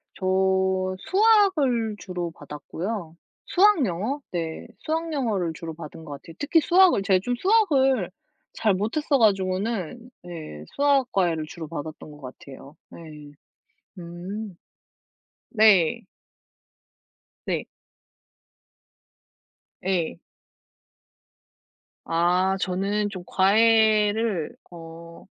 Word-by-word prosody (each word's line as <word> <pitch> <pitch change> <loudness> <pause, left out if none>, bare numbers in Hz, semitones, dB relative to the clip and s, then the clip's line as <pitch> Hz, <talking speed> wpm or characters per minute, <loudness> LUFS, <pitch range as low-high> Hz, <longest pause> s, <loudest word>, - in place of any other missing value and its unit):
저 185 - -6 0.8
수학을 375 - +3
주로 180 -3 -5
받았고요. 160 +5 -6 0.3
수학, 375 -7 +4
영어? 215 +11 -3
네, 165 -2 -4
수학, 325 +1 -3
영어를 210 - -1
주로 165 -1 -7
받은 160 0 -10
것 150 - -9
같아요. 160 +4 -12
특히 320 +3 +3
수학을 360 - +4
제가 190 -1 +3
좀 245 0 -1
수학을 270 - +2 0.4
잘 215 -3 +1
못했어 275 - 0
가지고는 205 +2 0
네 155 - -9
수학 280 -2 +2
과외를 170 -5 0
주로 160 0 -8
받았던 155 -1 -8
것 150 0 -14
같아요. 135 +2 -12
네. 150 -3 -12 0.7
음. 180 +4 -7 0.9
네. 215 -2 +4 1.5
네. - - -1 2.2
예. 175 - -1 1.9
아, 180 +3 +1
저는 200 +3 -1
좀 185 -3 -8
과외를 215 -1 +3 0.2
어 165 0 -12
195 Hz, 175 characters per minute, -24 LUFS, 165-240 Hz, 2.2 s, 수학